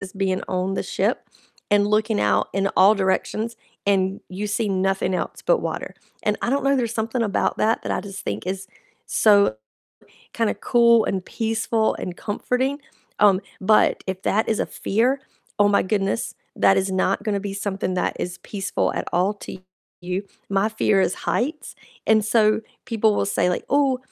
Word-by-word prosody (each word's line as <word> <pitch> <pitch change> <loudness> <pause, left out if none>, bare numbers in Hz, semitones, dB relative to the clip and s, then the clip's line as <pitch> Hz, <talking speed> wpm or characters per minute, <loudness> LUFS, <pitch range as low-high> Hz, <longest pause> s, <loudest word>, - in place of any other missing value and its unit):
is 195 -1 -8
being 190 -1 -1
on 185 +1 -1
the - - -1
ship - - -1 0.4
and 205 0 +4
looking 215 +1 +1
out 100 -1 +2
in 195 +1 +1
all 200 +3 +7
directions, 215 +3 -1 0.3
and 195 -1 +1
you 190 +3 -4
see 210 +1 -1
nothing 195 0 0
else - - -4
but - - +3
water, - - -4 0.3
and 210 0 +1
I - - 0
don't 275 +1 0
know, 275 0 +3
there's 235 -3 -1
something 230 +2 -1
about 205 -3 0
that 225 +2 +1
that - - -2
I - - -1
just 195 -1 -8
think 105 +2 -4
is 190 +1 -3 0.4
so 200 - +4 0.8
kinda 225 -2 0
cool 235 -2 +4
and 190 -2 -2
peaceful 225 0 0
and 180 -1 -6
comforting, 255 +6 -1 0.4
um, 200 -2 +5 0.2
but 210 +2 +3
if 190 0 -4
that 220 +2 +1
is 220 - +1
a - - 0
fear, 250 +7 0 0.4
oh 205 0 +5
my 205 - +3
goodness, 195 +2 -1 0.2
that 195 - +4
is 190 0 +1
not 190 +1 +1
gonna 205 -3 -1
be 200 0 -5
something 195 -2 -2
that 180 - -1
is 180 0 -4
peaceful 200 -2 -2
at - - -2
all 185 +4 +2
to 200 - -9 0.4
you. 180 +3 -3 0.3
My 200 +2 +2
fear 215 -2 +2
is 185 - +1
heights, 295 +6 -2 0.3
and 220 -1 +4
so 215 0 +3 0.3
people 220 -1 +2
will - - 0
say 180 -3 +1
like, 180 - -4
"Ooh, 275 -3 +3
205 Hz, 180 wpm, -23 LUFS, 190-225 Hz, 0.8 s, all